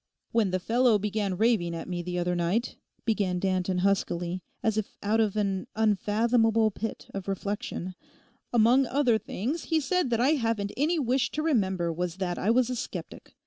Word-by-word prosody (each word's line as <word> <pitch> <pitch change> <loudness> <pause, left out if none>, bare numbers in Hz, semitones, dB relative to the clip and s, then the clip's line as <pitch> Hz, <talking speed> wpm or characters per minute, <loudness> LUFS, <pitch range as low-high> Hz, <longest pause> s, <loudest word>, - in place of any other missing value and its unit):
'When 225 -4 +2
the 185 - 0
fellow 235 +3 +3
began 205 -2 -2
raving 205 -6 +2
at 165 - -6
me 180 -1 -3
the 180 +1 -4
other 175 0 0
night,' 175 +8 0 0.3
began 200 -5 +1
Danton 185 0 0
huskily, 180 -2 0 0.2
as 220 -2 +1
if 215 -2 -3
out 215 +2 +2
of 215 -3 +1
an 195 -3 -1
unfathomable 220 +1 +2
pit 220 +2 -5
of 195 -1 -5
reflection, 200 -1 -3 0.6
'among 240 +3 +4
other 245 -4 +2
things 255 - -3
he 325 -1 +2
said 360 0 0
that 230 -1 +1
I 255 +3 +4
haven't 225 -8 0
any 315 +6 +1
wish 255 -3 +1
to 305 - -1
remember 190 - +1
was 175 0 -3
that 185 -2 -3
I 205 - 0
was 250 +1 +3
a - - -1
sceptic. 240 - -7
215 Hz, 180 wpm, -28 LUFS, 185-240 Hz, 0.6 s, among